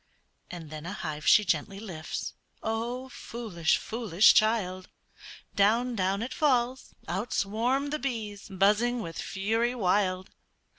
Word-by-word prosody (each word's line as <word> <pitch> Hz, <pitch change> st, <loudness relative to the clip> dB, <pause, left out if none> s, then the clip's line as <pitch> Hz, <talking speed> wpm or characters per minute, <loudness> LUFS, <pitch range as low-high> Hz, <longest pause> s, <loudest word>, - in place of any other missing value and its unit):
And 165 Hz, -4 st, -8 dB
then 155 Hz, +1 st, -7 dB
a 195 Hz, -, -4 dB
hive 155 Hz, -5 st, -5 dB
she 210 Hz, -, +7 dB
gently 195 Hz, 0 st, -1 dB
lifts, 175 Hz, -7 st, -5 dB, 0.3 s
Oh, 235 Hz, +4 st, -2 dB
foolish, 210 Hz, -11 st, -1 dB
foolish 215 Hz, -4 st, +4 dB
child, 190 Hz, -4 st, +1 dB, 0.7 s
Down, 230 Hz, +5 st, +3 dB
down 195 Hz, +1 st, 0 dB
it 255 Hz, +2 st, -5 dB
falls 260 Hz, -5 st, +1 dB
out 195 Hz, +7 st, -3 dB
swarm 245 Hz, +8 st, 0 dB
the 305 Hz, -, -1 dB
bees 220 Hz, -8 st, -4 dB
Buzzing 210 Hz, +5 st, +2 dB
with 165 Hz, -, -6 dB
fury 225 Hz, +6 st, 0 dB
wild. 185 Hz, -3 st, +1 dB
210 Hz, 130 wpm, -28 LUFS, 185-240 Hz, 0.7 s, she